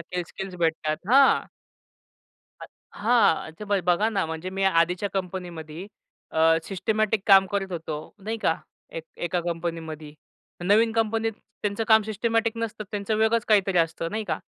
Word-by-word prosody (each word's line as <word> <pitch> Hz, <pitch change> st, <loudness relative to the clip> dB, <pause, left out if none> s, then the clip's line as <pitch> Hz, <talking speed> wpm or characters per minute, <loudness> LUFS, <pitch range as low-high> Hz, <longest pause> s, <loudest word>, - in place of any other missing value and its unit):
काही 175 Hz, +1 st, -4 dB
स्किल्स 190 Hz, -1 st, -7 dB
भेटतात 160 Hz, -2 st, 0 dB
हां. 275 Hz, +1 st, +6 dB, 1.2 s
अ, -, -, -7 dB, 0.3 s
हां. 210 Hz, -8 st, +3 dB
ते 210 Hz, -, -6 dB
ब 205 Hz, -1 st, +1 dB
बघा 180 Hz, +5 st, +3 dB
ना, 200 Hz, -6 st, 0 dB
म्हणजे 160 Hz, +3 st, -5 dB
मी 195 Hz, +1 st, -3 dB, 0.2 s
आधीच्या 180 Hz, +4 st, 0 dB
कंपनीमध्ये 175 Hz, -3 st, -5 dB, 0.5 s
अ, 160 Hz, -, 0 dB, 0.2 s
सिस्टिमॅटिक 215 Hz, +2 st, 0 dB
काम 195 Hz, -1 st, +7 dB
करत 195 Hz, -2 st, -2 dB
होतो. 160 Hz, -2 st, -4 dB, 0.3 s
नाही 225 Hz, +1 st, -2 dB
का? -, -, +3 dB, 0.4 s
एक -, -, -7 dB, 0.2 s
एका 175 Hz, +1 st, -1 dB
कंपनीमध्ये. 165 Hz, -3 st, -4 dB, 0.5 s
नवीन 220 Hz, +4 st, +4 dB
कंपनीत 225 Hz, 0 st, 0 dB, 0.3 s
त्यांचं 205 Hz, +2 st, -1 dB
काम 220 Hz, -1 st, +6 dB
सिस्टिमॅटिक 225 Hz, +2 st, -1 dB
नसतं, 225 Hz, -1 st, -4 dB
त्यांचं 205 Hz, +1 st, -2 dB
वेगळच 220 Hz, +1 st, +2 dB
काहीतरी 195 Hz, -4 st, +3 dB
असतं 165 Hz, 0 st, 0 dB
नाही 215 Hz, 0 st, -3 dB
का? -, -, -2 dB
195 Hz, 150 wpm, -25 LUFS, 170-220 Hz, 1.2 s, काम